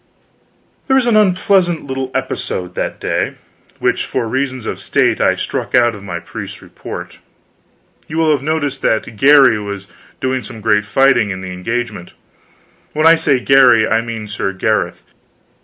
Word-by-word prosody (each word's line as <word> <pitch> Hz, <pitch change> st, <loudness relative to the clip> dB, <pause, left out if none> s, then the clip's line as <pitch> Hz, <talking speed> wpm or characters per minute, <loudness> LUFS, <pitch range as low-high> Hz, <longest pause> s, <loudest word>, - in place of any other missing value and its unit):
There 265 Hz, -, +3 dB
was 265 Hz, -2 st, +3 dB
an 235 Hz, -2 st, +2 dB
unpleasant 185 Hz, -4 st, +2 dB
little 135 Hz, -1 st, -4 dB
episode 90 Hz, -1 st, -3 dB
that -, -, -4 dB
day, -, -, -2 dB, 0.4 s
which -, -, 0 dB
for 115 Hz, -, -2 dB
reasons 130 Hz, 0 st, -2 dB
of -, -, -4 dB
state -, -, +1 dB
I -, -, +3 dB
struck -, -, -3 dB
out 120 Hz, -1 st, +4 dB
of 105 Hz, -, -10 dB
my 90 Hz, -4 st, -5 dB
priest's -, -, -8 dB
report. -, -, -9 dB, 0.9 s
You 160 Hz, -, -5 dB
will 160 Hz, -1 st, +3 dB
have 145 Hz, -3 st, +1 dB
noticed 150 Hz, -1 st, -2 dB
that 110 Hz, +1 st, 0 dB
Garry 135 Hz, -2 st, +5 dB
was 100 Hz, -1 st, -6 dB, 0.3 s
doing 130 Hz, 0 st, -1 dB
some 110 Hz, +1 st, -10 dB
great 105 Hz, -1 st, +1 dB
fighting 120 Hz, 0 st, +3 dB
in 95 Hz, -1 st, -5 dB
the 95 Hz, -1 st, -6 dB
engagement. 105 Hz, 0 st, -4 dB, 0.8 s
When 155 Hz, +1 st, 0 dB
I 165 Hz, -, +8 dB
say 140 Hz, -5 st, +2 dB
Garry 125 Hz, -4 st, +5 dB
I 110 Hz, 0 st, +2 dB
mean 115 Hz, -2 st, -6 dB
Sir 100 Hz, -1 st, -3 dB
Gareth. 105 Hz, +3 st, -1 dB
120 Hz, 160 wpm, -16 LUFS, 105-145 Hz, 0.9 s, I